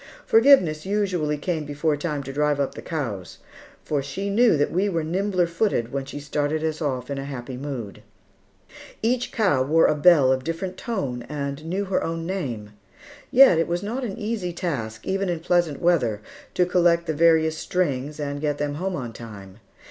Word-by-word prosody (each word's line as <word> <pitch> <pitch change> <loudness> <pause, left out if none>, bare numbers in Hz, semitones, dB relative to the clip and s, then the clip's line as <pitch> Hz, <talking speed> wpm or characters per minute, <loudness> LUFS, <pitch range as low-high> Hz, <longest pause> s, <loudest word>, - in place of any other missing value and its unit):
Forgiveness 220 - +5
usually 185 -7 0
came 160 +1 -2
before 145 +1 -1
time 145 -1 -3
to 135 0 -7
drive 150 0 +1
up 140 - -1
the - - -8
cows, 115 - -5 0.5
for 145 -2 0
she 190 +9 -4
knew 225 -4 +4
that 145 - +1
we 195 +4 +1
were 165 -4 -1
nimbler 180 +2 0
footed 170 - -1
when 135 -1 -3
she 140 - -7
started 150 +1 -1
us 160 0 -2
off 130 -3 -2
in 140 - -3
happy 135 -2 -6
mood. 125 -6 -6 1.0
Each 250 +2 0
cow 200 - +2
wore 155 +5 +4
a - - +4
bell 150 -3 +5
of 130 -1 0
different 165 +4 -4
tone 140 - -3
and 140 0 -4
knew 190 +5 -2
her 190 - 0
own 165 0 -3
name; 125 - -4 0.6
yet 250 -10 +7
it 165 - +1
was 175 +2 -2
not 240 +6 -3
an 205 -6 -4
easy 210 -4 -3
task, 115 -11 -4
even 195 0 -1
in 170 -2 -1
pleasant 170 -3 +1
weather, 125 -12 +2 0.3
to 180 - +3
collect 175 -1 +3
the 160 - -1
various 160 0 +4
strings 150 -5 -2
and 145 -1 -3
get 145 -1 -1
them 145 0 -2
home 190 0 -1
on 120 -7 -5
time. 105 -3 -11
155 Hz, 185 wpm, -24 LUFS, 140-180 Hz, 1.0 s, yet